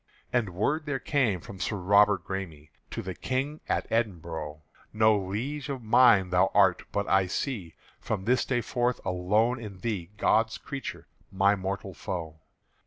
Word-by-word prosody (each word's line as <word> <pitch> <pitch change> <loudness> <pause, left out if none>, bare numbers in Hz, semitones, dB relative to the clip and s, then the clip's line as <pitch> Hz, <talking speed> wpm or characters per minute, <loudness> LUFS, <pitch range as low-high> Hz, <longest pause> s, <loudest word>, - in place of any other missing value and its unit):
And 110 -8 0
word 150 - 0
there 145 -2 0
came 125 - 0
from 95 +2 -10
Sir 105 - -1
Robert 100 0 +4
Græme 85 -6 -6 0.2
To - - -5
the 95 - -4
King 135 - -2
at - - 0
Edinbro': 80 -9 -2 0.3
"No 110 0 +4
Liege 115 +9 -3
of 135 -3 -4
mine 110 -5 +5
thou 90 0 +4
art; 95 -3 +5
but 100 0 -1
I 95 -1 +3
see 100 - -3 0.2
From 100 -3 -3
this 125 +2 +3
day 125 -2 0
forth 120 +1 -1
alone 105 +7 +1
in 105 -4 -8
thee 100 -7 -3
God's 110 +2 +2
creature, 140 -1 -7 0.3
my 100 +1 +3
mortal 95 0 -4
foe. 80 -4 -5
100 Hz, 160 wpm, -28 LUFS, 95-120 Hz, 0.3 s, mine